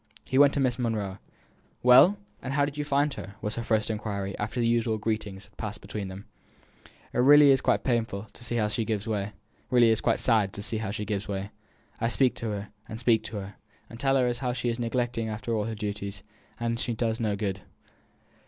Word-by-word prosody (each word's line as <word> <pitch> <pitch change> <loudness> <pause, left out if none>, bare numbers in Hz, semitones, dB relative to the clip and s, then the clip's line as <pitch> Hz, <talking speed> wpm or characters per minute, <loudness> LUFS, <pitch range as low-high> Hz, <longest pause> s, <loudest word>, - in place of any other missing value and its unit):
He 130 - +1
went 145 -1 +7
to - - +1
Miss 130 -2 +1
Monro. 105 -5 -2 0.6
"Well! 130 +11 +7 0.2
and 130 - -4
how 145 0 +3
did 145 0 -6
you 150 - -2
find 145 0 +1
her?" 100 +2 -8
was 105 - -3
her 120 - -3
first 110 -1 +1
inquiry, 100 -2 -3
after 110 +4 -3
the 120 - +2
usual 115 -1 +2
greetings 105 -2 -3
had 100 - -25
passed 105 -1 -5
between 105 -2 -5
them. 95 +2 -9 0.9
"It - - -1
is - - +5
really 145 0 +8
quite - - +1
sad 120 -3 +2 0.3
to - - -13
see 120 0 -3
how 110 -2 +2 2.2
she 100 - -3
gives 105 -1 -2
way; 100 0 -4 0.5
I 115 - +1
speak 125 +2 +3
to 115 - -3
her, 105 0 -4 0.2
and 110 - -6
speak 115 -3 +3
to 105 0 -5
her, 100 0 -7 0.4
and 115 - -10
tell 135 +1 +2
her 125 -2 +3
how 125 -2 0
she 120 -1 -1
is 115 +1 -2
neglecting 120 -1 -1
all 110 0 -2
her 115 -1 -3
duties, 100 -2 -5 0.4
and 115 0 -1
it 115 - -2
does 115 -1 0
no 110 -3 0
good." 100 -2 -3
115 Hz, 190 wpm, -27 LUFS, 105-125 Hz, 2.2 s, really